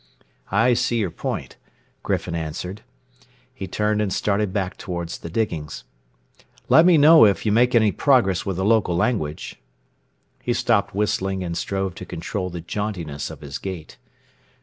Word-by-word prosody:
"I 115 +5 +3
see 120 0 0
your 100 -6 -1
point," - - -5 0.4
Griffin 90 - -2
answered. 85 +5 -5 0.7
He 100 -7 -6
turned 105 +3 0
and 105 -3 -1
started 100 +1 0
back 95 -2 -2
toward 85 -2 -5
the 85 - -7
diggings. 80 -7 -3 0.9
"Let 160 +3 +7
me 175 -3 +6
know 155 +2 +8
it 100 +1 +1
you 105 - +2
make 120 +4 +3
any 110 -3 +4
progress 120 - +2
with 95 - -3
the 95 - -1
local 110 -5 +3
language." 85 -6 -2 0.8
He 120 - -1
stopped 115 -5 +1
whistling 95 -2 -1
and 85 -1 -4
strove 95 0 -2
to - - -9
control 90 +3 -4
the 85 -1 -6
jauntiness 85 -6 -4
of - - -10
his 70 -1 -6
gait. 90 -5 -7
95 Hz, 155 wpm, -22 LUFS, 85-110 Hz, 0.9 s, know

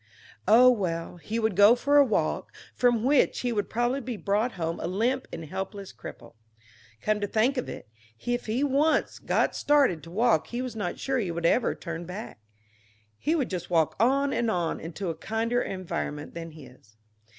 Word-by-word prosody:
Oh, 250 +4 +8
well, 175 -7 -2
he 210 +7 -4
would 220 -4 0
go 205 +4 +7
for 285 +4 +2
a 285 - +9
walk, 250 - -1 0.2
from 240 -3 +2
which 275 +2 +3
he 245 - -1
would 205 -2 -1
probably 240 +4 0
be 245 -3 -5
brought 210 +5 0
home 165 -2 -3
a - - -3
limp 230 +9 0
and 165 - -6
helpless 190 +3 -6
cripple. - - -11 0.7
Come 215 0 +1
to 205 - 0
think 225 +7 +2
of 250 - -3
it, - - -8 0.4
if 245 -1 -1
he 235 +6 0
once 290 +3 +1
got - - +1
started 280 - +3
to 165 - -12
walk 215 -3 +2
he 240 - -4
was 255 -3 -4
not 210 - -3
sure 265 -1 -1
he 200 -6 -2
would 170 0 -3
ever 235 +8 +2
turn 170 -1 -6
back; 195 - -7 0.8
he 315 - +1
would 275 -9 -1
just 180 -3 -4
walk 165 -3 +2
on 275 +5 +3
and 235 -1 0
on 175 -5 -1
into 170 +3 -4
a - - -7
kinder 225 +7 -1
environment 165 -5 -4
than 165 0 -6
this. 125 -7 -16
215 Hz, 190 wpm, -27 LUFS, 175-245 Hz, 0.8 s, a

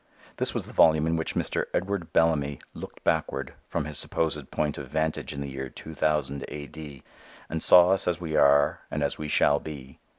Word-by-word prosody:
This - - +3
was - - -3
the - - -12
volume 80 -1 +5
in 80 +1 +1
which 80 -1 -2
Mr. - - -1
Edward 95 -2 -2
Bellamy 75 -4 +2 0.2
"looked - - -10
backward" 70 - -1
from 75 - -2
his 75 -1 0
supposed 75 -4 0
point 75 -1 -2
of 70 - -7
vantage 80 +3 -2
in 70 - -6
the 70 - -4
year 65 0 -6
2000 75 -3 -2
A. 75 0 -7
D. 70 -1 -10 0.4
and 80 0 -4
saw 90 0 +7
us 95 - +2
as 90 -1 0
we 80 -3 -4
are 70 0 +4
and 75 - -2
as 70 - -1
we 75 - -4
shall 70 -1 +3
be. 70 -4 -10
75 Hz, 200 wpm, -26 LUFS, 70-80 Hz, 0.4 s, saw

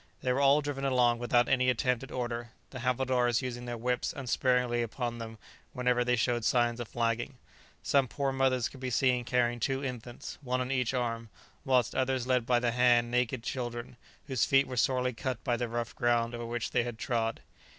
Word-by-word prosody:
They 125 - +2
were 135 - 0
all 140 +2 +5
driven 145 -2 -4
along 125 -3 +3
without 120 0 +2
any 130 -1 +3
attempt 125 0 +1
at 135 - -9
order, 120 -1 -4 0.2
the 130 - -7
havildars 125 -1 +1
using 120 -1 -5
their 120 -1 -4
whips 125 +7 -1
unsparingly 125 -2 +1
upon 120 +1 -3
them 110 -1 -7 0.4
whenever 125 -1 +1
they 125 0 +2
showed 120 +1 0
signs 120 0 +2
of 120 - -4
flagging. 120 +2 -2 0.5
Some 135 -2 +3
poor 140 +2 -1
mothers 130 -2 +1
could 135 - -13
be 130 0 -3
seen 125 0 +2
carrying 120 -1 +1
two 135 +4 -1
infants, 120 -2 -7
one 130 -2 -1
on 125 +1 -2
each 130 -1 0
arm, 115 -2 -2 0.3
whilst 130 -5 +2
others 130 -1 0
led 125 -2 +1
by 125 - +4
the 120 -1 +1
hand 120 -1 +3
naked 125 0 0
children, 120 -1 -4 0.3
whose 130 -4 0
feet 135 0 +4
were 130 - -6
sorely 125 0 +1
cut 120 0 -4
by 120 - +1
the 120 0 -2
rough 120 0 -3
ground 120 -1 +1
over 120 0 -5
which 120 -1 -3
they 125 - +2
had 120 -1 -5
trod. 115 -2 -2
125 Hz, 200 wpm, -30 LUFS, 120-130 Hz, 0.5 s, all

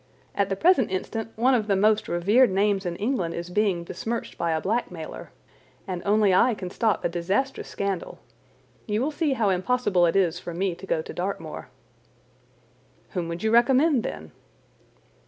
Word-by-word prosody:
At 200 -1 0
the 195 - 0
present 325 - +3
instant 220 +4 -3
one 250 +4 +3
of 220 -4 +1
the 200 - +2
most 210 +2 +2
revered 205 +9 +3
names 195 0 +1
in 170 - -3
England 200 -5 -1
is 170 +1 -6
being 195 -3 +1
besmirched 225 +7 -5
by 170 - -2
a 160 -1 +1
blackmailer, 180 -5 -4 0.6
and 180 -2 -4
only 205 -2 +4
I 230 +5 +4
can 185 -3 -6
stop 220 -3 0
a - - +5
disastrous 190 +11 -2
scandal. 200 -3 -3 0.7
You 210 0 0
will 275 +6 0
see 295 -1 0
how 225 -6 +1
impossible 185 -2 +2
it 165 - 0
is 175 -3 +2
for 175 -1 -7
me 190 +1 0
to - - -11
go - - 0
to 450 - -8
Dartmoor." - - -5 1.4
"Whom 180 -4 -3
would 170 +3 -5
you 220 - +1
recommend, 260 +4 +4
then?" 80 - -6
200 Hz, 175 wpm, -25 LUFS, 180-235 Hz, 1.4 s, a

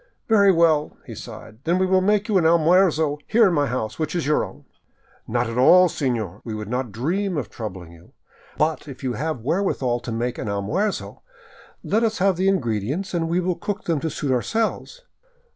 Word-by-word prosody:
" - - -47
Very 200 -3 +5
well," 165 -4 +2
he - - -8
sighed, 110 0 -10
" - - -39
then 170 +2 +1
we 190 - +2
will 185 0 +3
make 210 +2 +2
you 205 -4 +3
an - - 0
almuerzo 160 -2 +3
here 225 -1 +5
in 180 - +1
my 145 -3 +1
house, 120 0 -3
which 155 +2 -2
is 170 - -1
your 150 +1 +2
own." - - -10 0.3
" - - -35
Not 120 +1 0
at 115 +2 -3
all, 180 +7 +7
senor; 115 - -3
we 110 -2 -5
would 105 -1 -6
not 125 -1 -2
dream 175 - -1
of 145 - -4
troubling 95 -7 -7
you. 85 +1 -18 0.4
But 155 0 0
if 135 -2 -10
you 130 -2 -1
have 150 +2 -3
wherewith 180 - 0
to 120 -2 -2
make 120 +2 -2
an - - -4
almuerzo, 105 - -2 0.6
let 220 - +1
us 220 -1 0
have 195 0 +2
the 185 +3 0
ingredients 140 - -1
and 165 -2 -1
we 170 +2 +1
will 180 0 0
cook 205 +4 -5
them 165 -3 0
to 160 - -2
suit 145 -3 -3
ourselves." 225 - -2
155 Hz, 210 wpm, -23 LUFS, 120-185 Hz, 0.6 s, all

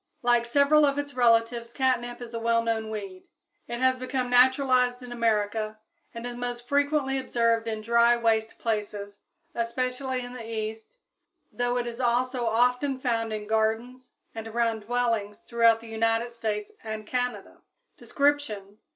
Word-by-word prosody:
Like 240 -1 +3
several 285 +4 +4
of 280 -1 +2
its 285 0 -3
relatives 235 -1 +2
catnip 245 -2 0
is 240 -1 -8
a 230 - -3
well 230 0 +2
known 225 -1 -1
weed. 195 -4 -7 0.4
It 240 +1 -5
has 260 0 +3
become 255 -1 -2
naturalized 255 0 +4
in 245 - -9
America, 220 -2 0 0.3
and 230 +1 -7
is 245 0 -5
most 245 0 -5
frequently 285 -1 +1
observed 230 -3 +1
in 220 -1 -3
dry, 235 +2 +4
waste 225 -1 0
places, 205 -2 -3 0.3
especially 255 +2 -2
in 245 - -9
the 250 -2 -7
East, 220 - -5 0.5
though 245 0 -1
it 245 - -1
is 235 0 -6
also 245 0 +1
often 250 +4 +2
found 230 -3 -1
in 215 -1 -4
gardens 220 +4 -1 0.2
and 225 0 -6
around 230 0 0
dwellings 225 -2 -1
throughout 230 -1 +4
the 230 - -11
United 225 +1 0
States 215 -3 -3
and 220 -1 -5
Canada. 245 +2 -3 0.4
_Description. 260 -9 -1
235 Hz, 150 wpm, -27 LUFS, 225-250 Hz, 0.5 s, several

